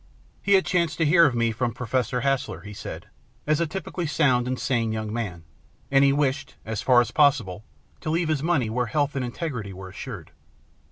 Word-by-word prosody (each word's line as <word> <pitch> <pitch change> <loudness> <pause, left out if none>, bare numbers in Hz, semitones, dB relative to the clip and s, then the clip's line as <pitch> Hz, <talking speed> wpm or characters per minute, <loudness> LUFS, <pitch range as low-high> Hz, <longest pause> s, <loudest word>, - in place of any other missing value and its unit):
He 200 - +2
had 190 -1 +5
chanced 170 -3 +1
to 165 - +2
hear 165 +2 +6
of 130 - -1
me 115 -1 +2
from 120 +1 -2
Professor 125 +1 -1
Haslar, 135 0 -1
he 105 +1 -9
said, - - -7 0.4
as 155 0 +2
a 170 - +1
typically 170 +1 -4
sound 130 -5 +2
and 130 0 -2
sane 115 -4 0
young 110 -1 -3
man, 100 -8 -4 0.5
and 135 0 +5
he 140 - +5
wished, 140 -1 -1
as 110 -1 -3
far 125 -2 +5
as 120 - -3
possible, 130 -10 +2 0.4
to - - -5
leave 165 +1 0
his 155 -3 +1
money 160 -7 +1
where 120 +2 -1
health 145 +3 0
and 135 - -1
integrity 120 - -4
were 95 0 -9
assured. 95 - -8
130 Hz, 205 wpm, -25 LUFS, 115-150 Hz, 0.5 s, hear